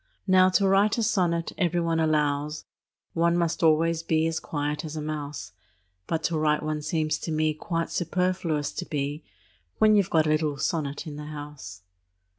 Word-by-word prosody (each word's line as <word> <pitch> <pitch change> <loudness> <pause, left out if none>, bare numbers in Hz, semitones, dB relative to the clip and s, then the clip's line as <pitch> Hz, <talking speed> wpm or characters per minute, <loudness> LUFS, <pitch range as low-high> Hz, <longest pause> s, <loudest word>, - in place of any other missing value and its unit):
Now, 185 -1 +5
to 200 - +2
write 200 +3 +3
a 230 - +1
sonnet, 175 -6 +1
every 175 -2 +1
one 165 -1 0
allows, 150 -1 0 0.5
One 170 +1 +2
must 170 +1 0
always 165 0 +3
be 160 -1 +1
as 165 -1 -1
quiet 150 0 -3
as 155 -1 -6
a 155 - -3
mouse; 150 -7 -5 0.6
But 165 - -1
to 165 -2 0
write 150 -1 +1
one 155 0 -2
seems 155 -1 -1
to 165 - -5
me 155 0 +1
Quite 165 +2 -3
superfluous 175 -4 -1
to 180 - -5
be, 145 0 -3 0.5
When 215 0 +5
you 205 - +6
've 185 - -6
got 160 -1 +3
a - - 0
little 155 -2 +1
sonnet 145 -1 -2
in 150 -2 -7
the 150 - -7
house. 145 -12 -9
155 Hz, 185 wpm, -26 LUFS, 150-170 Hz, 0.6 s, you